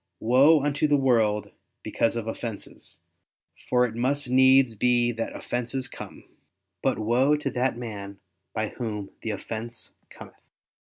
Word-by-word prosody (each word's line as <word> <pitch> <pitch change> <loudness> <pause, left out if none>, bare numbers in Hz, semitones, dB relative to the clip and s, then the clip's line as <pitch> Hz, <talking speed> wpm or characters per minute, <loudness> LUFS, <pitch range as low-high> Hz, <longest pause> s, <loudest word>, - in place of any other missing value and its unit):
"Woe 135 +6 +5
unto 145 +1 +1
the 145 -1 +3
world 110 -6 +1 0.3
because 115 - 0
of 115 -2 -3
offenses, 115 -1 -7 0.7
for 125 0 +4
it 115 - -5
must 130 +3 -1
needs 130 -1 +5
be 120 +2 +2
that 115 -1 -4
offenses 125 +2 -3
come; - - -10 0.6
but 135 - +1
woe 125 +7 +2
to 145 -2 -3
that 125 -1 0
man 100 -4 -7 0.3
by 110 -1 -2
whom 105 -5 -5
the 115 - -4
offense 110 +3 -6 0.2
cometh." - - -14
120 Hz, 140 wpm, -26 LUFS, 110-130 Hz, 0.7 s, Woe